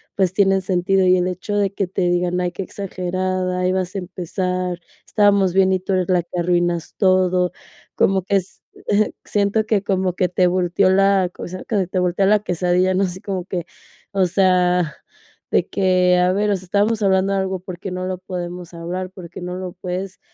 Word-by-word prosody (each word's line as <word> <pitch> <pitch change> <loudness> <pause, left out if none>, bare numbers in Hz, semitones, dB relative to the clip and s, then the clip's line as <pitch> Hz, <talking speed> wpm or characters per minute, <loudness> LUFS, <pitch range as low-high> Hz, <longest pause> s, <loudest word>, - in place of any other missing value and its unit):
pues, 190 -2 +1
tienen 195 0 +3
sentido, 185 +1 +1
y 180 - +6
el 180 0 +1
hecho 185 +3 -4
de 200 -1 +1
que 195 -2 -1
te 190 - -3
digan: 175 0 0
"Ay, 180 -1 -1
qué 190 +2 -5
exagerada, 185 -1 -3
ahí 185 0 +1
vas 185 0 -2
a 195 - -1
empezar, 180 0 -3 0.3
estábamos 200 -3 +3
bien 190 0 +4
y 190 - +2
tú 190 +1 -3
eres 185 -1 0
la 180 -1 +3
que 175 +1 -8
arruinas 175 -1 0
todo", 185 -2 +2 0.4
como 190 -1 +2
que 200 - 0
es 185 0 -6 0.6
siento 205 +1 +1
que, 215 -2 +1
como 190 -2 0
que 180 - +1
te 180 +1 +2
volteó 180 +1 +2
la, 195 -1 +3
o - - -6
sea, 185 +1 -7
que 200 -5 -1
te 185 0 -1
volteó 180 +2 +1
la 210 +2 +4
quesadilla, 180 0 +1
¿no?, 190 - +2
así 185 +1 -6
como 190 -3 -4
que, 180 -3 -4 0.5
o 195 -2 +2
sea, 180 -3 +2 0.6
de - - +2
que, 185 -1 +3
a 180 +1 +3
ver, 205 +2 +1
o 200 - +2
sea, 185 - -11
estábamos 205 +4 +1
hablando 195 -1 +2
algo, 190 -1 -1
¿por 180 -1 -9
qué 195 - -6
no 185 0 -3
lo 185 0 -3
podemos 180 -1 -6
hablar?, 175 +2 -5
¿por 180 -3 -10
qué 175 - -9
no 180 0 -5
lo 185 -1 -5
puedes, 185 +1 -5
185 Hz, 205 wpm, -20 LUFS, 180-195 Hz, 0.6 s, y